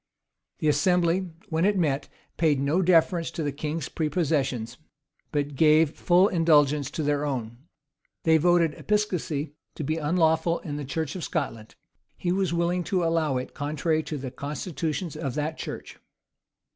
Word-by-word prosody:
The 155 - -1
assembly, 175 +4 +2 0.2
when 160 0 0
it 205 +1 +3
met, 145 -5 0 0.3
paid 155 -4 +2
no 145 +7 +1
deference 170 -1 +3
to 165 - -4
the 145 - -1
king's 150 +3 -4
prepossessions, 145 -7 -1 0.5
but 145 -1 -1
gave 155 +1 +5
full 180 +2 +4
indulgence 150 -6 +3
to 155 - -3
their 145 0 +1
own. 120 -5 -3 0.6
They 160 -1 +5
voted 170 -1 +3
episcopacy 170 -9 -1 0.2
to - - -4
be 155 +3 -1
unlawful 160 +1 +2
in 145 -3 -5
the 145 - -5
church 150 +3 -3
of 180 - -5
Scotland: 115 -9 -4 0.4
he 175 - -1
was 190 -2 +1
willing 170 +1 0
to 180 +2 0
allow 165 -5 +1
it 125 - -5
contrary 155 +2 -1
to 155 -1 -5
the 130 -2 -6
constitutions 150 +4 -4
of 135 -3 -4
that 155 +1 -2
church. - - -7
155 Hz, 155 wpm, -26 LUFS, 145-170 Hz, 0.6 s, gave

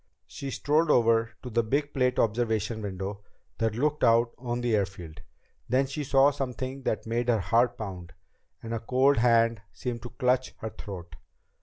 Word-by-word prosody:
She 85 - -7
strolled 150 +4 +1
over 115 -3 +3
to 125 - -6
the 115 +1 +3
big 140 +6 -1
plate 125 -2 +2
glass - - +4
observation 110 0 -2
window 100 0 -5 0.4
that 110 -1 0
looked 150 +4 0
out 115 0 +4
on 120 -1 -3
the 120 -2 +1
airfield. 90 -6 -4 0.5
Then 130 +3 +3
she 140 +3 -4
saw 135 0 +4
something 135 -1 -4
that 110 - -2
made 120 +2 -1
her 115 -2 +3
heart 120 +6 +2
pound, 90 -5 -7 0.5
and 115 0 -5
a 115 - -1
cold 130 +4 +3
hand 115 -2 +3
seemed 120 -2 -5
to 120 - -7
clutch 125 +1 0
her 110 - -6
throat. 90 -6 -9
115 Hz, 175 wpm, -28 LUFS, 110-130 Hz, 0.5 s, glass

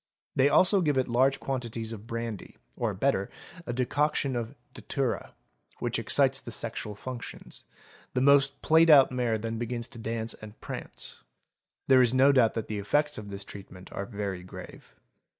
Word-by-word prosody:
'They 135 +2 +4
also 190 +5 +5
give 150 -5 +1
it 130 - +2
large 130 +3 +2
quantities 115 -4 -3
of 110 0 -10
brandy 115 -4 -5 0.2
or - - -1
better - - 0 0.4
a - - -1
decoction 135 +2 0
of 120 +3 -4 0.2
datura, 135 -4 -3 0.4
which - - -1
excites - - +3
the - - -9
sexual 105 -1 -3
functions; 125 +3 -8 0.5
the - - +3
most 140 +1 +4
played 160 +1 +5
out 140 -4 +8
mare 120 -3 0
then 115 +1 -4
begins 120 0 -3
to 120 - -11
dance 115 0 -2
and 105 0 -12
prance; - - -6 0.7
there 130 -1 +7
is 125 0 +3
no 135 +2 +6
doubt 125 -5 +3
that 115 -2 -2
the 105 -1 -3
effects 145 +8 0
of 105 - -9
this 100 0 -6
treatment 95 -2 -12
are 100 - -5
very 100 -4 -4
grave. 90 - -11
120 Hz, 170 wpm, -28 LUFS, 110-135 Hz, 0.7 s, out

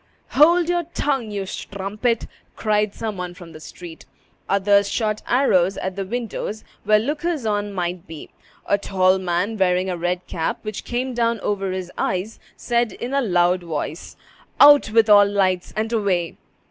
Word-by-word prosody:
"Hold 335 +4 +5
your 350 -1 0
tongue, 270 -6 -1
you 200 -2 -4
strumpet!" 205 +5 -3 0.3
cried 210 -1 0
some 215 -3 -4
one 180 -1 -5
from 175 -3 -12
the 155 - -11
street. 165 +1 -11 0.4
Others 200 0 +3
shot 215 -2 -1
arrows 195 -8 +2
at 190 0 -4
the 195 - -3
windows 220 -1 -4 0.2
where 215 +1 +5
lookers 295 +4 -2
on 205 -1 -1
might 180 -2 -4
be. 160 -2 -10 0.3
A 200 - +1
tall 190 -1 +2
man, 185 +4 -1
wearing 185 0 +2
a 180 - -3
red 175 +1 -2
cap 160 -1 -2
which 215 -1 -6
came 250 +2 -2
down 235 -1 0
over 195 -2 -1
his 185 -1 -4
eyes, 190 +4 -2 0.2
said 235 -3 0
in 245 +3 -6
a 275 - +2
loud 180 -4 +2
voice, 160 -1 -5 0.4
"Out 290 -4 +8
with 225 0 +4
all 205 -1 +8
lights, 190 -3 0
and 220 +2 -1
away!" 190 -6 0
200 Hz, 165 wpm, -22 LUFS, 180-230 Hz, 0.4 s, Out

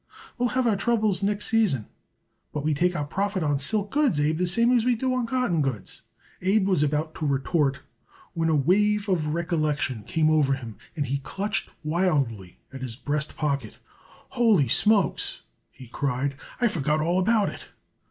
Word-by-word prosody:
"We'll 245 0 +2
have 260 - +2
our 225 -3 +3
troubles 215 -2 +1
next 205 +1 0
season, 205 - +1 0.7
but 150 - -4
we 155 0 +1
take 175 +5 +1
our 150 - -2
profit 195 +3 -2
on 145 -2 +1
silk 205 +8 0
goods, 280 - +2
Abe, 150 +2 +1
the 180 - +1
same 230 +7 +3
as 235 - +3
we 250 0 +2
do 255 +3 -1
on 250 -2 -1
cotton 235 -10 0
goods." 130 -8 -4 0.4
Abe 190 +2 +2
was 185 -6 +2
about 150 +2 0
to 155 - -4
retort 140 0 0 0.5
when 165 -2 0
a 160 - +3
wave 205 +8 +2
of 160 -5 0
recollection 155 - -1
came 155 +8 +1
over 145 -3 +3
him, 120 -5 -9 0.2
and 145 -3 -1
he 140 +2 -2
clutched 205 +9 -3
wildly 145 - -1 0.2
at 135 - -8
his 125 -3 -5
breast 150 +3 -2
pocket. 140 -7 -2 0.5
"Ho 240 -1 +1
ly 190 -11 +5
smokes!" 205 - +2 0.3
he 130 - -14
cried. 140 +2 -2 0.3
"I 245 - +3
forgot 155 -6 0
all 170 +4 +1
about 210 +2 +2
it." - - -10
165 Hz, 180 wpm, -25 LUFS, 140-210 Hz, 0.7 s, ly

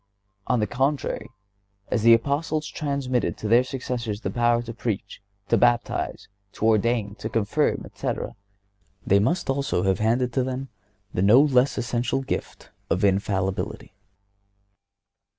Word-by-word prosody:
On 125 - +2
the 105 - +2
contrary, 135 +7 -1 0.6
as 115 - 0
the 115 +1 +8
Apostles 150 +5 -1
transmitted 140 -6 -2
to 110 - -4
their 120 +3 +5
successors 125 -5 -4
their - - -3
power 120 0 +2
to 115 0 -7
preach, 110 -5 -4 0.3
to - - +4
baptize, 120 -1 +1 0.3
to - - -3
ordain, 110 -1 +2
to 110 - -4
confirm, 110 -3 0
etc., - - -4 0.7
they 100 - +4
must 165 - 0
also 135 -10 0
have 95 -1 +1
handed 120 +3 +1
down 130 +2 +1
to 130 - -2
them 130 +1 -5 0.4
the - - 0
no 105 +6 +7
less 135 -2 +3
essential 120 +2 -1
gift - - -5 0.2
of 90 - 0
infallibility. 95 -1 -1
120 Hz, 140 wpm, -24 LUFS, 105-130 Hz, 0.7 s, the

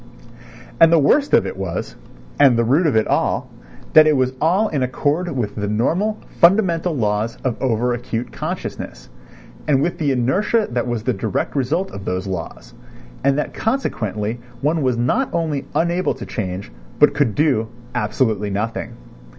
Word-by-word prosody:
And 165 0 +7
the 170 - +6
worst 275 - +3
of - - +4
it - - -4
was, 95 -3 -4 0.4
and 125 -3 +6
the 115 - +3
root 145 +9 +3
of 140 - +1
it 110 - +3
all, - - 0 0.4
that 155 0 +8
it 150 -2 +4
was 130 0 +1
all 185 +8 +3
in 145 -8 -2
accord 145 +7 0
with 110 -4 -2
the 105 -1 -2
normal 170 - 0 0.2
fundamental 175 -2 +4
laws 110 -1 0
of 125 -3 0
over 125 -1 +1
acute 120 0 -4
consciousness, 110 - -6 0.6
and 140 -3 +3
with 170 +5 -1
the 145 -3 +1
inertia 185 - +1
that 120 0 -1
was 120 -3 -2
the 125 +1 0
direct 110 +3 -2
result 155 +8 0
of 100 - -8
those 90 +1 -2
laws, 80 -10 -6 0.5
and 140 +1 +3
that 150 - -2
consequently 115 - -2 0.2
one 155 +3 +1
was 130 -3 +1
not 185 - +1
only 155 -5 -1
unable 175 +2 +1
to - - -8
change 95 - -5 0.3
but 150 - +5
could 135 -8 +1
do 135 -8 +2 0.3
absolutely 105 -2 0
nothing. 105 +3 -3
130 Hz, 165 wpm, -20 LUFS, 110-160 Hz, 0.6 s, that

